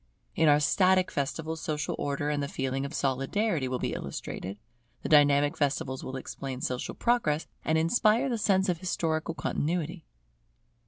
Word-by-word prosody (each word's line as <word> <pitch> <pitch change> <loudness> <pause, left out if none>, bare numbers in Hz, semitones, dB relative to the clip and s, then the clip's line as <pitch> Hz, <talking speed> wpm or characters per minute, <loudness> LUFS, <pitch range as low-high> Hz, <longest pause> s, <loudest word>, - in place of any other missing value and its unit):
In 160 -2 +4
our 145 0 +6
static 185 +4 +3
festivals 160 +3 -3
social 150 -1 -2
Order 145 +1 -1
and 145 -1 -1
the 140 - -2
feeling 135 0 -2
of 140 - -11
Solidarity, 135 - 0
will 130 0 -1
be - - -2
illustrated; 95 +2 -5 0.5
the - - -3
dynamic 145 -1 +5
festivals 135 -2 -1
will 130 - -5
explain 130 0 -6
social 125 -1 -3
Progress, 170 -11 +1 0.2
and 160 - +2
inspire 215 +9 +3
the 240 -4 -1
sense 190 -2 +2
of 175 -3 0
historical 165 -3 -1
Continuity. 165 +2 -2
150 Hz, 155 wpm, -28 LUFS, 140-180 Hz, 0.5 s, our